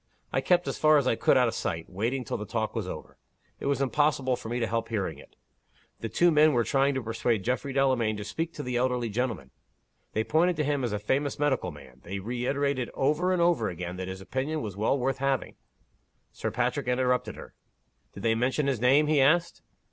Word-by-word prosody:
I - - +2
kept 175 -1 +2
as - - -3
far 155 0 +6
as 140 - +2
I 130 - +3
could - - +3
out 125 -1 +4
of 115 - -2
sight, 80 -6 -3
waiting 115 +8 -2
till - - -3
the 105 - -6
talk 110 -1 -2
was 110 -5 -2
over. 80 - -8 0.4
It - - -4
was 140 -1 +1
impossible 135 -2 +1
for 110 - -8
me 120 +1 -1
to 115 - +1
help 115 +1 -2
hearing 105 -5 -2
it. - - -16 0.6
The 115 - -4
two 170 +11 +3
men 155 0 +5
were 120 -2 +3
trying 135 +4 +2
to 130 - -2
persuade 115 -2 -1
Geoffrey 125 +4 -1
Delamayn 130 -5 +1
to 105 - -5
speak 160 +10 -3
to 145 - -5
the 125 -1 -2
elderly 125 -2 0
gentleman. 110 - -3 0.6
They 110 - +1
pointed 170 +7 +2
to 155 - 0
him 145 -2 0
as 120 - -1
a 105 - -1
famous 135 +8 -1
medical 145 -10 0
man. 65 -5 -13
They 95 +3 -5
reiterated 125 +4 -1
over 155 +7 +1
and 180 -2 +2
over 170 -11 +2
again, 90 0 -5
that 95 0 -4
his 95 0 -6
opinion 140 +8 -3
was 100 -3 -5
well 110 +7 +1
worth 135 +1 -1
having 135 -2 0 0.4
" - - -45
Sir 110 - -3
Patrick 125 +4 -1
interrupted 125 0 +1
her. - - -11 0.6
"Did - - -8
they 115 -1 +3
mention 130 +5 0
his 135 -5 0
name?" 135 +5 +5
he 150 -2 +3
asked. 165 +5 +2
125 Hz, 225 wpm, -28 LUFS, 110-140 Hz, 0.6 s, far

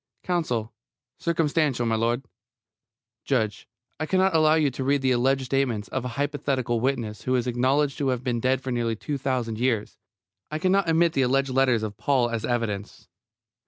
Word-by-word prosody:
COUNSEL: 125 -11 -1 0.5
Circumstantial, 155 -6 +1
m'lud. 115 +3 0 1.0
JUDGE: 110 -7 -1 0.3
I 155 - -2
cannot 190 0 +2
allow 155 -1 +5
you 150 -3 +2
to 130 - -4
read 140 +1 +1
the 130 - +3
alleged 130 +2 +2
statements 125 -6 -1
of 130 - -3
a - - -3
hypothetical 140 -4 -1
witness 115 -4 -2
who 130 - 0
is 125 -1 +1
acknowledged 130 +4 +1
to 140 - 0
have 125 -1 -1
been 120 -2 -1
dead 130 +2 +1
for 130 0 -4
nearly 120 -2 0
two 140 +6 -4
thousand 125 -4 -2
years. 120 -4 -1 0.5
I 155 - -3
cannot 185 +1 +2
admit 165 0 +3
the 135 - +1
alleged 135 +1 +2
letters 130 -4 +2
of 105 -2 -5
Paul 120 +1 +1
as 115 -1 -2
evidence. 110 -4 -3
130 Hz, 170 wpm, -25 LUFS, 120-145 Hz, 1.0 s, allow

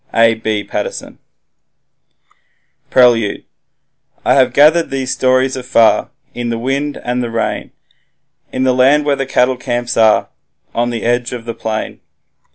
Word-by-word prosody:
A. 115 0 +5
B. 110 -2 -3
Paterson - - -6 1.7
Prelude 120 -5 +3 0.8
I - - +4
have 130 -2 +3
gathered 155 +3 +4
these 135 -1 -2
stories 130 +1 +1
afar, 125 -3 +2 0.2
In 120 -1 -4
the 115 - -2
wind 140 +4 -2
and 125 +1 -2
the 120 - -3
rain, 115 0 -3 0.8
In 130 - -2
the 130 -1 +2
land 135 +4 +3
where 145 -1 +2
the 135 -1 -4
cattle 130 -1 +1
camps 120 0 -3
are, 110 -1 +3 0.4
On 120 +1 0
the 115 -2 -4
edge 120 +1 0
of 120 -2 -7
the 115 - -4
plain. 110 -1 -5
125 Hz, 145 wpm, -15 LUFS, 115-130 Hz, 1.7 s, A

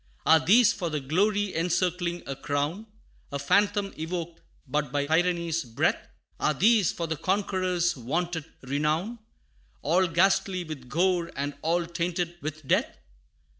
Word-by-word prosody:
Are 160 +1 +7
these 230 +4 +6
for 180 -6 -3
the 150 -1 -2
glory 200 +8 +1
encircling 175 +1 0
a 135 - -4
crown 145 +11 -2 0.4
A 140 - -2
phantom 200 +7 +1
evoked 165 0 -4 0.3
but 145 0 -1
by 145 0 0
tyranny's 170 +1 +1
breath? 115 -3 -1 0.3
Are 150 - +1
these 210 - +4
for 170 - -4
the 160 0 -2
conqueror's 185 -2 0
vaunted 160 +5 -2 0.2
renown 155 - -1 0.6
All 180 +5 +3
ghastly 185 +2 +2
with 145 -6 -8
gore, 175 +1 +1
and 145 +1 -2
all 170 +2 +1
tainted 170 0 -3
with 155 -1 -6
death? - - +1
170 Hz, 135 wpm, -27 LUFS, 155-185 Hz, 0.6 s, Are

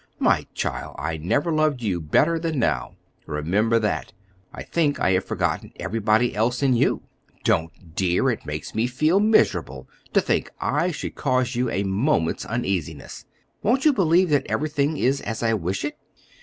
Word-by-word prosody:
My - - +2
child, - - -3
I 80 +1 -3
never 140 - 0
loved 155 -5 +1
you 95 -5 -1
better 155 - +2
than 165 -2 -2
now; 75 - 0 0.3
remember 100 +10 +1
that. 105 -4 -1 0.4
I - - -8
think 150 -4 0
I 95 - +2
have 95 0 +1
forgotten - - -2
everybody 110 +2 +1
else 120 +5 0
in 135 -2 +4
you." - - +1 0.4
"Don't, 80 +1 -1
dear! 95 +9 +2
it 115 - -5
makes 75 0 -6
me 110 +2 +1
feel 155 +9 +2
miserable 135 - +2 0.3
to - - +5
think - - 0
I 180 - +1
should 165 - -5
cause 130 -2 0
you 125 +1 0
a 100 - -1
moment's 95 - 0
uneasiness. 90 - -3 0.4
Won't 255 +6 +1
you 305 - +6
believe 180 - +3
that 145 - +2
everything 150 0 0
is 135 +2 +1
as 110 +2 -4
I 115 -1 +2
wish 95 -2 -2
it?" - - -5
115 Hz, 170 wpm, -24 LUFS, 95-150 Hz, 0.4 s, you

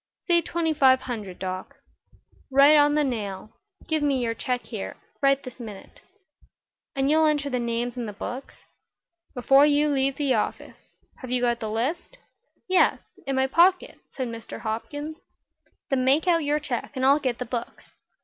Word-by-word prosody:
"Say 345 -2 +4
twenty 330 -1 -1
five 260 -3 +4
hundred, 210 -8 -6
Doc." 185 0 -5 0.7
"Right 280 +3 +6
on 290 0 +5
the 300 - +3
nail. 215 -6 -4 0.4
Give 315 -1 0
me 285 -2 +1
your 235 -2 -1
check 250 +1 -3
here 215 -5 -6 0.2
this 275 -2 +1
minute." 210 -5 -10 0.9
"And 270 0 +1
you'll 310 +2 +4
enter 290 -2 0
the 250 - 0
names 235 0 -2
in 240 -2 -4
the - - -5
books?" 250 +6 -7 0.8
"Before 270 +3 +5
you 295 0 +3
leave 270 -1 +1
the 280 -3 +1
office. - - -4 0.3
Have 255 - -9
you 250 0 +1
got 240 -1 +1
the 220 - -4
list?" 270 - -3 0.5
"Yes; 370 0 +1
in 270 - -1
my 265 0 +2
pocket," 350 +7 +3
said 260 -2 -4
Mr. 230 -1 -8
Hopkins. 290 +8 -5 0.7
"Then 260 -1 +2
make 275 +6 +3
out 335 -2 +3
your 295 +1 +1
check 280 -3 -4
and 260 0 0
I'll 280 +2 +5
get 255 -4 -2
the 250 - -4
books." 240 -2 -6
265 Hz, 170 wpm, -25 LUFS, 240-295 Hz, 0.9 s, Right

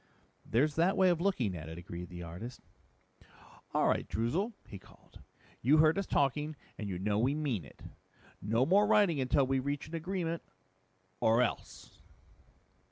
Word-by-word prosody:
"There's 145 +6 +1
that 175 +4 +3
way 190 -1 +5
of 170 -2 +1
looking 130 - 0
at 80 -1 -7
it," 80 - -8
agreed 85 0 -8
the 90 -1 -8
artist. 90 +9 -8 1.1
"All - - +2
right, - - +1
Droozle," 165 - -1
he 100 - -10
called. - - -19 0.4
"You 140 +6 +5
heard 155 +1 +5
us 195 - -3
talking 150 +2 0 0.2
and 105 -2 -5
you 90 - -3
know 100 +3 0
we 130 +5 +2
mean 135 - -1
it. 70 - -16 0.6
No 115 +5 +1
more 200 +6 +4
writing 195 -9 +4
until 130 +1 +2
we 135 0 +1
reach 140 +3 -3
an - - -13
agreement 170 0 -2 0.8
or 115 +2 +4
else!" 120 - -5
135 Hz, 165 wpm, -32 LUFS, 105-165 Hz, 1.1 s, way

